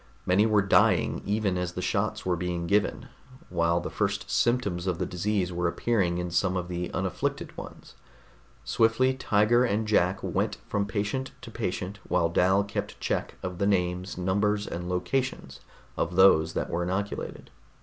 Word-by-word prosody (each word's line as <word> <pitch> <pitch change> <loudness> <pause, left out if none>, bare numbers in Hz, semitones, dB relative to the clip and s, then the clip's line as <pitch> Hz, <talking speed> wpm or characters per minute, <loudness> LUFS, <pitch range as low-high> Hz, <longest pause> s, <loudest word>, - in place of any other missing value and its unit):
Many 100 +4 +4
were 105 -2 +3
dying 95 - +3
even 100 -3 0
as 90 -1 -3
the - - -5
shots 105 +3 -1
were 90 -1 +1
being 90 0 -3
given, 100 +3 +1 0.4
while 85 -1 +1
the 85 - -5
first 100 +1 -2
symptoms 100 -7 +1
of 90 -3 0
the 90 - -1
disease 90 0 -1
were 85 0 0
appearing 90 -2 0
in 90 0 -3
some 90 +2 +1
of 90 -1 -4
the 90 0 -3
unafflicted - - -3
ones. - - -10 0.7
Swiftly 120 +4 +3
Tiger 120 -1 +3
and 110 -2 0
Jack 95 -3 +3
went - - -1
from 100 0 -1
patient 105 +6 -2
to 115 - -9
patient 100 -2 -4
while 85 -2 +2
Dal 95 +4 +3
kept 100 - -5
check - - -2
of 90 -1 -5
the 100 - +2
names, 90 -1 0
numbers 100 +3 +1
and 90 +1 -5
locations 90 - -2 0.4
of 85 +2 -2
those 95 -4 +5
that - - -2
were 85 - -1
inoculated. 95 +3 -4
95 Hz, 165 wpm, -27 LUFS, 90-105 Hz, 0.7 s, those